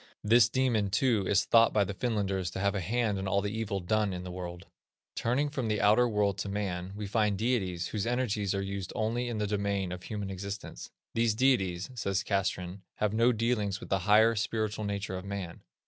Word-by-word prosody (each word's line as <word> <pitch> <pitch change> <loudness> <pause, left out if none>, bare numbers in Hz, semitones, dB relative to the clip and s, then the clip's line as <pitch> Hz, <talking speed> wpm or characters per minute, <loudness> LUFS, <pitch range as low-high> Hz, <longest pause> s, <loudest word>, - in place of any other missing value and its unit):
This 115 +1 +5
demon, 120 -5 +1
too, 105 -1 +2
is 100 - +3
thought 115 -1 +5
by 105 - +4
the 100 - -4
Finlanders 95 -5 -1
to - - -4
have 100 0 +1
a 100 - -2
hand 110 +1 0
in 95 - -3
all 100 +1 +2
the 100 +2 -3
evil 105 -3 -2
done 105 +2 0
in 90 0 -5
the 90 - -6
world. 90 -1 -7 0.5
Turning 125 +6 +1
from 135 -5 -3
the 105 -1 0
outer 110 +4 +5
world 105 -3 +1
to 100 - -3
man, 95 -3 -3
we 105 0 -4
find 105 0 +1
deities 95 -7 -1
whose 105 0 -2
energies 110 -5 0
are 100 - -1
used 100 -1 -4
only 120 +2 -1
in 115 - -3
the 105 - 0
domain 100 -2 -1
of 90 0 -6
human 100 -1 -5
existence. 100 +1 -6 0.2
"These 115 -1 +2
deities," 100 -6 +1
says 100 -5 -1
Castrén, 95 -2 -2 0.2
"have 105 -1 0
no 115 +3 +4
dealings 110 -4 0
with - - -10
the 95 - +2
higher, 110 +2 +6
spiritual 110 0 -2
nature 100 -2 -3
of - - -10
man. 100 -4 -6
105 Hz, 210 wpm, -30 LUFS, 95-115 Hz, 0.5 s, higher